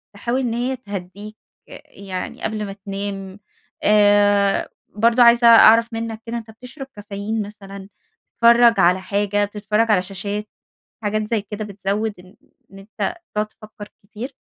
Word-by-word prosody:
تحاول 235 +5 -2
إن 245 -3 -2
هي 245 +3 -2
تهدّيك 205 -2 -9 0.3
أ - - -11
يعني 190 -2 -7
قبل 215 -1 -3
ما 195 - -7
تنام؟ 195 -1 -6 0.4
آآ 205 -1 +3 0.3
برضه 230 +3 +4
عايزة 235 0 +6
أعرف 230 0 +7
منّك 225 -1 -5
كده 235 0 -4
أنت 225 -1 -9
بتشرب 255 +5 -11
كافيين 205 +1 -4
مثلًا، 200 -1 -10 0.5
بتتفرّج 235 0 +5
على 180 +2 +3
حاجة، 205 +1 0
بتتفرّج 210 +2 -1
على 195 -4 +3
شاشات 200 +3 -5 0.6
حاجات 215 +1 -1
زي 220 - +1
كده 210 +1 -7
بتزوِّد 205 +1 -3
إن 185 +1 -17 0.4
إن 195 - -12
أنت 215 - -5 0.2
تقعد 210 0 0
تفكّر 215 -1 -13
كتير؟ 220 +6 -8
210 Hz, 145 wpm, -20 LUFS, 200-230 Hz, 0.6 s, أعرف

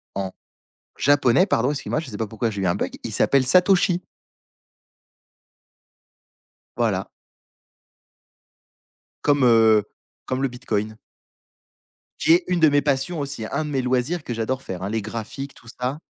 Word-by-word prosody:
en 95 -1 -3 0.7
japonais, 145 +4 +4
pardon, 125 - +1
excuse-moi, 150 +2 -2
je 160 - -9
sais 105 - -6
pas 110 - -2
pourquoi 110 +2 -2
j'ai 100 -2 -4
eu - - +1
un 85 - +2
bug. - - -3
Il - - -4
s'appelle 135 -2 +3
Satoshi. 180 +2 +3 2.7
Voilà. - - 0 2.1
Comme, 145 -2 +3
heu, 110 -3 +5 0.4
comme 130 +1 -2
le 135 - +2
Bitcoin 110 -4 -3 1.2
qui 160 - +5
est 175 +1 +4
une 180 -1 0
de 160 -2 +6
mes 145 0 +3
passions 145 +4 -1
aussi, 140 -6 -4
un 155 - -1
de - - -5
mes 135 -2 0
loisirs 130 +6 -1
que 120 - -4
j'adore 120 +4 -2
faire, 95 0 -6
hein, 100 - -2
les 110 0 -1
graphiques, 115 +6 -6
tout 115 - -18
ça. 125 +5 -4
130 Hz, 150 wpm, -23 LUFS, 110-145 Hz, 2.7 s, de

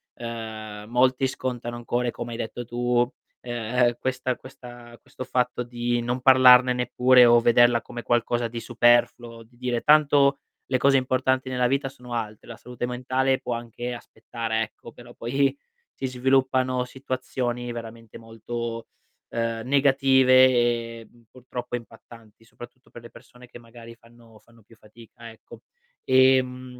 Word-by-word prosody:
ehm, 110 -2 -8
molti 130 +2 +2
scontano 120 -2 -5
ancora 120 +1 -2
e - - -3
come 120 +1 -7
hai 115 - -6
detto 120 +2 -6
tu, 120 +1 0 0.3
ehm, 120 0 -1
questa 130 -1 -2
questa 120 -2 -13
questo 130 - -9
fatto 125 -1 -1
di 120 0 -2
non 120 +2 -3
parlarne 125 -1 +6
neppure, 125 0 +4
o 120 0 +6
vederla 120 0 +4
come 120 0 -9
qualcosa 120 0 0
di 115 0 -6
superfluo, 120 -1 +1
di 120 +2 -26
dire: 125 -2 -2
"Tanto 145 -2 +4 0.3
le 130 - +2
cose 135 +2 +3
importanti 130 0 0
nella 125 -1 0
vita 135 +1 -1
sono 125 -2 -12
altre, 110 -2 -5
la 115 - -8
salute 125 0 -6
mentale 130 +2 -1
può 120 - -4
anche 120 +1 -6
aspettare." 115 -1 -5
Ecco, 110 +2 -8
però 120 +1 -15
poi 135 +3 -1 0.4
si 135 - -6
sviluppano 130 0 +1
situazioni 125 -2 -4
veramente 115 -1 -10
molto, 115 +1 -6 0.4
ehm, 115 0 -3
negative 135 -1 +3
e, 120 -2 0
mhmm, 120 -1 -24
purtroppo 125 -1 -7
impattanti, 115 -1 -16
soprattutto 120 +2 -15
per 120 - -13
le 120 - -13
persone 125 0 -17
che 120 - -13
magari 115 0 -14
fanno 115 -1 -20
fanno 115 -1 -24
più 115 - -21
fatica, 115 +1 -15
ecco. 110 - -16 0.4
Ehm, 130 -1 +2
120 Hz, 150 wpm, -24 LUFS, 115-130 Hz, 0.4 s, parlarne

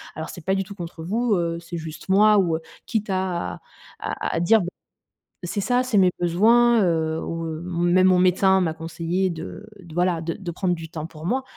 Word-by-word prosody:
alors 160 0 -5
c'est 175 - -9
pas 190 - +2
du 195 - 0
tout 200 +2 -11
contre 170 -3 -7
vous, 225 +6 0
heu, 170 -1 -1
c'est 170 0 -7
juste 160 +2 -8
moi», 210 +2 +6
ou 170 -4 +1 0.3
quitte 215 -2 -2
à 185 -2 -2 0.4
à - - -3
à - - +1
dire 215 +5 +5 0.8
c'est 175 +3 -3
ça, 245 +5 +2
c'est 250 -4 0
mes 185 -2 +5
besoins, 225 +6 +4
heu, 160 -2 0
ou 165 0 -4 0.4
même: 185 +2 +4
«Mon 185 -1 +4
médecin 190 +1 +4
m'a 165 -3 0
conseillé 170 +3 -2
de 170 +5 -7
d 170 -4 -13
voilà, 175 -1 +1
de 165 0 -3
de 180 -2 -6
prendre 180 +1 0
du 165 -1 -9
temps 160 -1 -6
pour 155 -1 -11
moi. 260 +8 0
180 Hz, 200 wpm, -23 LUFS, 165-195 Hz, 0.8 s, moi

